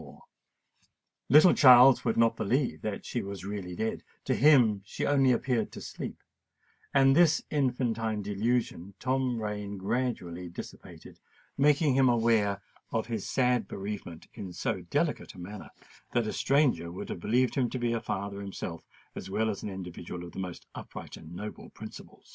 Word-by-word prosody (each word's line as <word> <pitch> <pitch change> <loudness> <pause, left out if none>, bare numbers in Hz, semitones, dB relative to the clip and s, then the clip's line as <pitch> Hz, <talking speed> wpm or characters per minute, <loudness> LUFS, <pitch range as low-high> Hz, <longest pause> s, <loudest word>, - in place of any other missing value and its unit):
The - - -13 1.1
little 155 +6 +8
Charles 125 -1 +8
would 115 - 0
not 115 0 +4
believe 125 +5 0
that 105 -2 -4
she 120 - -2
was 100 -2 -7
really 100 -3 -5
dead; 110 +4 -2 0.2
to - - +1
him 120 -8 +5
she - - -4
only 135 -2 +4
appeared 120 -1 0
to - - -7
sleep; - - -7 0.7
and 135 -1 +5
this 165 -1 +4
infantine 115 -6 0
delusion 105 -2 -1
Tom 130 -2 0
Rain 105 -1 -4
gradually 95 -5 -3
dissipated, 85 - -11 0.4
making 145 0 +3
him 130 -1 +4
aware 110 -4 +2 0.3
of 115 -2 -1
his 110 -4 -4
sad 125 -5 +1
bereavement 100 -4 -6
in 95 -5 -7
so 95 +3 -2
delicate 85 - -2
a - - -11
manner, 100 +4 -8 0.4
that 120 -2 +2
a 110 - -3
stranger 130 - +2
would 90 - -7
have - - -4
believed 125 +7 +1
him 125 -3 +1
to - - -4
be 120 -1 0
a 115 - -1
father 100 +1 -4
himself 95 -4 -6 0.3
as 95 - -7
well 110 +3 0
as 100 - -6
an - - -4
individual 90 -2 -7
of 85 - -10
the - - -8
most 90 -2 -6
upright - - -9
and 80 +2 -11
noble 105 +3 -7
principles. - - -12
110 Hz, 165 wpm, -29 LUFS, 95-125 Hz, 1.1 s, little